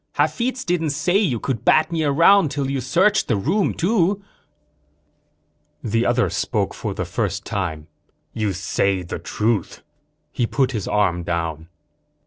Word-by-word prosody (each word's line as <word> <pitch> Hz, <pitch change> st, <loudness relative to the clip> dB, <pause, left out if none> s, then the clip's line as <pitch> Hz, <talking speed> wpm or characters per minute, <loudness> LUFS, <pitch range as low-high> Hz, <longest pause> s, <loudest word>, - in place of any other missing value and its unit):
"Hafitz 255 Hz, +2 st, -1 dB
didn't 170 Hz, -3 st, 0 dB
say 175 Hz, +6 st, 0 dB
you 145 Hz, -, 0 dB
could 120 Hz, -2 st, -3 dB
bat 155 Hz, +5 st, +4 dB
me 165 Hz, -2 st, 0 dB
around 165 Hz, +4 st, +5 dB
till 135 Hz, -1 st, -2 dB
you 135 Hz, -1 st, -1 dB
searched 190 Hz, +11 st, +2 dB
the 115 Hz, -, +2 dB
room, 170 Hz, -, +1 dB
too." 190 Hz, +1 st, +1 dB, 1.6 s
The 115 Hz, +1 st, 0 dB
other 120 Hz, -3 st, +2 dB
spoke -, -, -1 dB
for -, -, -5 dB
the -, -, -3 dB
first -, -, -3 dB
time. 80 Hz, -6 st, -3 dB, 0.5 s
"You 105 Hz, -2 st, -1 dB
say 95 Hz, 0 st, -1 dB
the 85 Hz, -, -6 dB
truth." 110 Hz, -3 st, -2 dB, 0.5 s
He 120 Hz, -, -1 dB
put 135 Hz, 0 st, +1 dB
his 110 Hz, -6 st, -4 dB
arm 95 Hz, -4 st, +1 dB
down. 85 Hz, -2 st, -3 dB
130 Hz, 145 wpm, -21 LUFS, -, 1.6 s, around